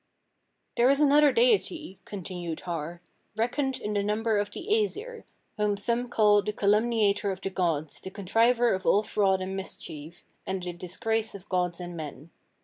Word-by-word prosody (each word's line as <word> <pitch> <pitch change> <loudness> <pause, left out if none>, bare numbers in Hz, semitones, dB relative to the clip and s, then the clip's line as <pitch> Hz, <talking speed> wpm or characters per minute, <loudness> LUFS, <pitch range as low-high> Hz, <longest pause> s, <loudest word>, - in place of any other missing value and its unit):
34. - - +2
"There 245 - +6
is 275 +1 +3
another 295 0 +6
deity," 380 - +1
continued 175 -4 -6
Har, 170 0 -5 0.3
"reckoned 260 +4 0
in 210 - -3
the 205 - +1
number 210 +1 +1
of 205 0 -1
the - - -7
Æsir, 440 +2 -1 0.3
whom 210 -1 +1
some 235 +4 -1
call 210 -3 +4
the 210 - -2
calumniator 210 0 +2
of 190 -1 -3
the 195 - -3
gods, 165 -5 -1
the - - -8
contriver 230 +5 +2
of 190 0 -3
all 205 - +4
fraud 195 -3 +1
and 190 +1 -4
mischief, 165 -4 -7 0.2
and 190 -1 -3
the 180 -1 -4
disgrace 215 +5 -2
of 200 0 -11
gods 180 -2 0
and 175 -1 -6
men. 155 0 -8
205 Hz, 170 wpm, -28 LUFS, 180-235 Hz, 0.3 s, There